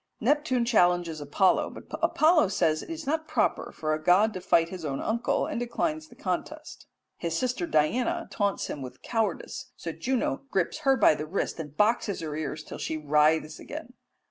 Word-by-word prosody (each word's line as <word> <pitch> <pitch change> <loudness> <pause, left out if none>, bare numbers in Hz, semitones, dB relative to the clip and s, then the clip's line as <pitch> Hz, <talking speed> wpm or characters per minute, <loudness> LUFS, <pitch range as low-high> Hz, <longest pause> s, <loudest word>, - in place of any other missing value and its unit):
Neptune 260 -1 +2
challenges 175 -8 +2
Apollo, 165 +7 +2
but - - -10 0.2
Apollo 315 - +4
says 155 -5 +1
it - - -11
is 325 -1 -5
not 315 +3 -1
proper - - 0
for 155 0 -2
a 155 - -2
god 200 +6 +4
to 185 - -5
fight 165 -1 +3
his 185 -2 -7
own 140 -3 -2
uncle, 230 +2 0
and - - -3
declines 310 +6 -2
the - - -17
contest. - - -5 0.3
His 165 -1 -2
sister 250 -9 -1
Diana 250 - +1
taunts 200 -2 0
him 145 - -5
with 130 -1 -9
cowardice, 225 -2 -2
so - - -5
Juno 260 +1 -1
grips 190 - 0
her 270 -3 +3
by 210 - +6
the 150 0 -5
wrist 175 0 -2
and 150 -2 -7
boxes 210 -2 +2
her 155 -2 -4
ears 155 0 -4
till - - -9
she 160 - -2
writhes 155 +1 +2
again. - - -8
190 Hz, 185 wpm, -27 LUFS, 155-255 Hz, 0.3 s, by